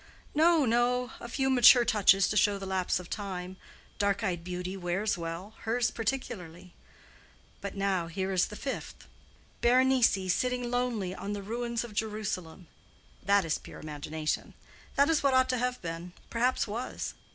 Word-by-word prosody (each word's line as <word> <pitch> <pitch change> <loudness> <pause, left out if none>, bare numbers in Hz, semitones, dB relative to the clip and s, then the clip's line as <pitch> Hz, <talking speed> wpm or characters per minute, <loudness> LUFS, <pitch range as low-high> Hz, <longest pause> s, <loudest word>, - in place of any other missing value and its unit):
"No, 320 -1 +4
no; 245 +1 +1
a 235 - -8
few 265 +2 0
mature 245 -1 +7
touches 195 -3 +4
to - - -1
show 205 -1 +3
the 195 - -6
lapse 190 -1 0
of 180 - -9
time. 185 -2 -5 0.4
Dark 200 +1 +1
eyed 175 -5 -1
beauty 180 +1 -4
wears 190 +3 -1
well, 170 +4 -6
hers 235 +2 0
particularly. 185 -8 -4 0.9
But 200 0 -5
now, 195 -3 0
here 190 +3 -3
is 185 -1 +2
the 210 - -9
fifth: 270 +5 -6 0.6
Berenice 255 0 +5 0.2
seated 250 +2 -1
lonely 240 -6 -1
on 200 +2 -5
the 200 -1 -5
ruins 235 +2 -2
of 235 -3 -9
Jerusalem. 205 -5 -3 0.6
That 200 0 +3
is 155 - 0
pure - - -11
imagination. 155 +1 -4 0.4
That 280 +1 +5
is 325 -2 +2
what 275 -2 +3
ought 260 0 +4
to 255 -1 +1
have 250 +1 -1
been—perhaps 180 +9 -2
was. 230 +5 -4
205 Hz, 155 wpm, -29 LUFS, 180-245 Hz, 0.9 s, mature